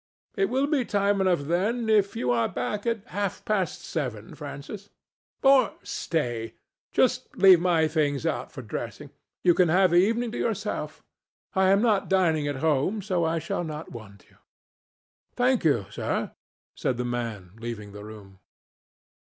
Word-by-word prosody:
"It 195 - +2
will 265 +3 +1
be 285 -3 +1
time 200 -2 +1
enough, 185 -5 +2
then, 200 +10 0
if 210 -2 +3
you 125 - 0
are 115 -1 +1
back 205 - -3
at 230 -3 -1
half 200 0 -3
past 195 -6 -1
seven, 125 -9 -4
Francis. 150 +8 -8 0.5
Or 270 -4 +5
stay: 120 -8 -3 0.4
just - - +1
leave 190 -3 +8
my 170 -3 +3
things 145 -4 0
out - - -2
for - - -8
dressing. - - -6 0.3
You 175 - +6
can 180 -1 +3
have 185 +2 +4
the 175 - +4
evening 225 +5 +2
to - - -5
yourself. 210 -2 -3 0.5
I 190 -2 +3
am 200 +3 +4
not 215 -4 +2
dining 165 -6 +2
at 145 - -2
home, 160 +8 +1
so 185 -4 0
I 165 +1 0
shall 165 +2 -2
not 155 -1 -6
want 100 -4 -11
you." - - -25 1.0
"Thank 250 0 +2
you, 140 -11 +2
sir," - - -2 0.4
said 125 - -1
the 125 - -2
man, 115 -7 -4
leaving 115 -3 -6
the 105 0 -9
room. 105 -3 -12
175 Hz, 160 wpm, -26 LUFS, 125-205 Hz, 1.0 s, leave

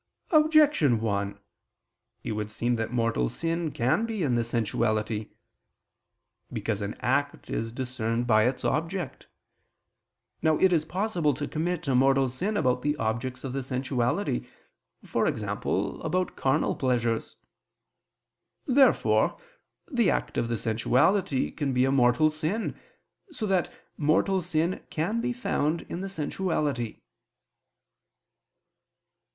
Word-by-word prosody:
Objection 305 - +5
1: 100 -2 -1 0.9
It - - -3
would 105 -1 -3
seem 120 +3 0
that 115 0 -3
mortal 115 - +1
sin 165 -1 -2
can 130 - +1
be 220 -5 -2
in 135 -5 +1
the 120 0 +2
sensuality. 110 -2 -1 1.2
Because 110 -2 -2
an 100 +1 -3
act 145 +4 -1
is 115 0 -2
discerned 120 -2 -2
by 110 -2 +4
its 125 0 -2
object. 165 -1 -2 1.1
Now 155 -1 +3
it 190 -1 +4
is 155 -2 +2
possible 175 - 0
to 145 +1 -4
commit 165 0 -2
a 135 - +2
mortal 135 +1 +4
sin 190 - -2
about 125 -7 +1
the 150 +2 0
objects 120 +3 -2
of 135 -2 -4
the 135 - -2
sensuality, 125 - -1 0.6
e.g. - - -1
about 185 0 -1
carnal 135 +3 +1
pleasures. 120 -3 0 1.3
Therefore 270 0 +4 0.5
the 240 - +2
act - - -1
of 115 - 0
the 115 0 -1
sensuality 130 - +1
can 140 -4 -2
be 125 +1 +3
a 135 - +1
mortal 135 +3 +4
sin, 160 +9 -2 0.5
so 305 -10 -4
that 190 -3 +1 0.3
mortal 170 +5 +2
sin 170 +1 -1
can 200 +9 -1
be 250 +1 -1
found 170 - -1
in 175 - -4
the 195 - -4
sensuality. 150 - -2
135 Hz, 125 wpm, -27 LUFS, 120-175 Hz, 1.3 s, Objection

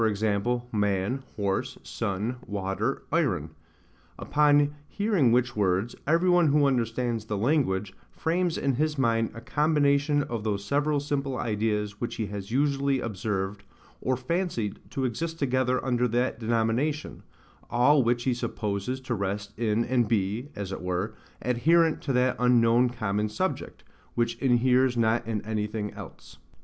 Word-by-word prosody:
man, 105 +4 0
horse, 100 -2 -1
sun, 105 +6 -3
water, 100 +5 -2
iron: 110 - 0 0.7
upon 145 -1 +3
hearing 200 - +2
which 120 0 +2
words, 100 +2 +1
every 165 +4 +3
one 175 -2 +5
who 145 0 +4
understands 120 -3 0
the 105 -2 -3
language, 105 -6 +1 0.2
frames 170 +1 -1
in 140 - +1
his 155 0 0
mind 115 -3 +2
a - - -6
combination 145 +1 +2
of 115 -5 -4
those 100 -2 -2
several 145 +4 +1
simple 140 -2 -2
ideas 105 -2 -1
which 120 - -3
he 110 - -2
has 100 -1 -6
usually 140 +1 +1
observed, 100 -2 -3 0.4
or 130 0 0
fancied 130 - -2
to 135 -2 -2
exist 165 +7 -3
together 130 -3 0
under 125 -1 +2
that 120 0 0
denomination; 115 +6 -1 0.5
all 140 +4 +4
which 120 0 +1
he 130 - +1
supposes 110 +1 -3
to 130 -2 -4
rest 100 0 -3
in 115 0 +1
and 120 -3 +2
be, 110 +5 -1
as 100 -2 -5
it - - -5
were, 90 +4 -2 0.3
adherent 160 +7 +3
to 140 - -2
that 125 0 +2
unknown 120 0 +4
common 105 -3 -1
subject, 105 - -3 0.3
which 120 0 0
inheres 125 0 +3
not 115 0 +2
in 110 -3 -2
anything 105 -1 -2
else. - - -11
120 Hz, 140 wpm, -27 LUFS, 105-140 Hz, 0.7 s, one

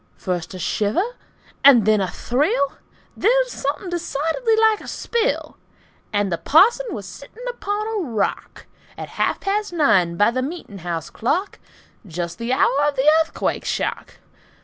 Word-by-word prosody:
First 180 0 -4
a - - -5
shiver, 220 - -1 0.5
and 250 -7 +7
then 215 -1 +4
a 190 - -1
thrill, 275 - 0 0.4
Then 430 - +3
something 350 - -4
decidedly 345 - 0
like 440 -1 +3
a - - -11
spill, 470 +1 -2 0.5
And 205 -2 0
the 170 - -1
parson 470 - +4
was 210 - -6
sitting 280 - -11
upon 425 -3 -3
a 445 -1 -2
rock, 215 -4 -3 0.3
At - - -7
half - - -1
past 410 +1 -1
nine 185 - +3
by 205 +4 +4
the 255 +2 -1
meet'n' 265 - -6
house 170 -2 -4
clock, 355 - -1 0.5
Just 170 +3 -5
the 230 +1 -3
hour 275 +2 +3
of 290 - -1
the 265 +3 +1
Earthquake 320 - -2
shock! - - -3
280 Hz, 150 wpm, -21 LUFS, -, 0.5 s, and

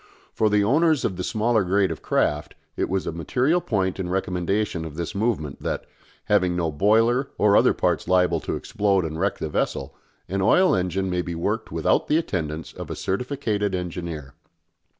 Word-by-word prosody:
For 110 - +2
the 105 0 +3
owners 155 +5 +3
of 95 - -1
the 90 - -4
smaller 110 +1 +1
grade 95 0 +2
of 80 - -6
craft 75 0 0 0.2
it - - -1
was 95 0 -1
a - - -2
material 130 - +1
point 95 - -1
in 90 -2 -3
recommendation 95 0 -1
of 80 -2 -7
this 85 0 -4
movement 100 - -2
that, - - -3 0.4
having 90 -4 +2
no 85 -2 0
boiler 115 - +3
or 105 -1 +4
other - - +5
parts - - 0
liable 90 -2 +3
to - - -3
explode 100 -3 0
and 80 0 -4
wreck 95 +2 0
the - - -3
vessel, 75 - -2 0.3
an 95 0 -2
oil 180 - +4
engine 95 +1 -1
may 90 0 0
be 85 -1 -5
worked 105 +7 -2
without - - +1
the 150 - +3
attendance 80 - -3
of - - -8
a - - -4
certificated 105 -3 -1
engineer. 85 -6 -5
95 Hz, 185 wpm, -24 LUFS, 85-110 Hz, 0.4 s, other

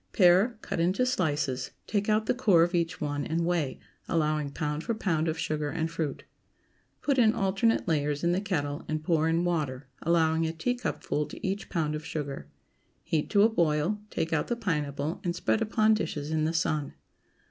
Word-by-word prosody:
✠ - - -41
Pare, 190 +5 +5
cut - - -3
into 185 +9 +2
slices, 145 - 0 0.2
take 205 0 -1
out 215 +1 +2
the - - +2
core 200 -9 +4
of 175 +2 0
each 170 -2 0
one, 145 -1 -2
and 165 +3 -1
weigh, 170 -6 -1 0.3
allowing 155 -2 +1
pound 150 +2 -3
for 230 - -1
pound 165 -6 0
of 160 0 -1
sugar 150 -2 -2
and 160 +2 -2
fruit. 160 -4 -3 0.8
Put 280 -3 +2
in 220 -2 +5
alternate 195 +3 +1
layers 150 -2 0
in 170 - +3
the 180 +2 +1
kettle 145 -7 -2
and 155 0 -2
pour 160 -1 +2
in 165 +1 +2
water, 150 -6 -1 0.2
allowing 160 -1 +2
a 160 - -3
teacupful 165 -5 -2
to - - -6
each 195 +2 -3
pound 155 -5 -1
of 155 +1 -4
sugar. 140 - -5 0.6
Heat 155 -2 -1
to 205 -1 +5
a 220 - +6
boil; 170 0 +1
take 165 -3 -2
out 155 - +1
the 240 - 0
pineapple 150 -6 -2
and 175 -2 -1
spread 215 - 0
upon 220 0 +3
dishes 155 -8 -2
in 155 -1 +1
the 160 - +1
sun. 155 -3 -1
165 Hz, 190 wpm, -28 LUFS, 150-195 Hz, 0.8 s, a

